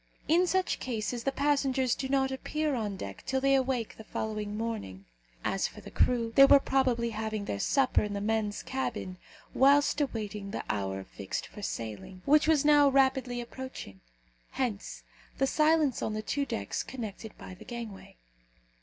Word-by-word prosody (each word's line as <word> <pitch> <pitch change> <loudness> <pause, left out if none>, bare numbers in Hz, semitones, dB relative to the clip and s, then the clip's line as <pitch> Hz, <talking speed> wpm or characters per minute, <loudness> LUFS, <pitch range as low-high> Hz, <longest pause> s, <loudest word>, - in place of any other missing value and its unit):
In 350 +3 +4
such 375 +1 +1
cases 235 -1 -3
the 275 - +2
passengers 270 -3 +1
do 265 - -4
not 265 -1 +2
appear 300 +3 -2
on 210 -6 -2
deck 100 - -7
till 265 - +1
they 275 +1 +3
awake 260 -4 0
the 220 - -9
following 215 -1 -4
morning. 215 - -4 0.4
As - - 0
for - - -12
the - - -11
crew, 235 -2 +2
they 275 - +10
were 280 - +8
probably 250 -4 +1
having 215 -1 -3
their 100 - -3
supper 270 - +2
in 210 -1 -3
the 200 - -2
men's 210 0 -1
cabin, 220 -8 -4 0.3
whilst 285 +2 +4
awaiting 210 -6 -3
the - - -4
hour 95 -2 -3
fixed 95 0 -5
for 210 - -11
sailing, 115 - -6
which 300 +2 +5
was 310 -3 +3
now 295 -1 +6
rapidly 265 -2 +2
approaching. 240 - -8 0.5
Hence 240 -6 -3 0.3
the 270 - +3
silence 305 -2 +2
on 215 - -2
the 215 - -3
two 280 +5 -1
decks 100 0 -3
connected 220 -3 -7
by - - -9
the 180 - -12
gangway. 230 -5 -8
240 Hz, 170 wpm, -30 LUFS, 210-275 Hz, 0.5 s, they